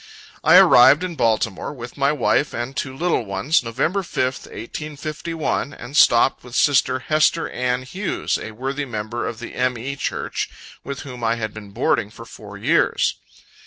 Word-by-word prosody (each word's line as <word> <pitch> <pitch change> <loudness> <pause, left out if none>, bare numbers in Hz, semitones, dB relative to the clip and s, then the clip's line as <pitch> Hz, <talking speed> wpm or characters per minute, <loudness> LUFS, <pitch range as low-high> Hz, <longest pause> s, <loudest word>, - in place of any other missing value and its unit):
I - - +6
arrived 135 +7 +7
in 180 -1 -3
Baltimore, 115 - 0
with 120 -4 -9
my 140 0 +2
wife 150 -1 +1
and 120 +3 -4
two 130 -1 -4
little 170 -6 +1
ones, 100 - +1
November 155 - -1
5th, 130 -7 -2
1851, 150 +4 -4
and 125 +4 -10
stopped 120 -2 +4
with 125 0 -10
sister 140 -4 +3
Hester 155 +3 +2
Ann 125 0 -1
Hughes, 185 +10 -2
a - - -6
worthy 135 +6 -4
member 115 -1 -4
of 115 - -5
the 120 - -8
M. 125 -1 0
E. 135 +4 -5
Church, - - -3 0.3
with 140 0 -6
whom 125 -4 -9
I 115 0 +2
had 110 -2 -4
been 110 -2 -10
boarding 105 -1 0
for 115 +2 -12
four 105 -3 -11
years. - - +2
130 Hz, 165 wpm, -21 LUFS, 115-145 Hz, 0.3 s, arrived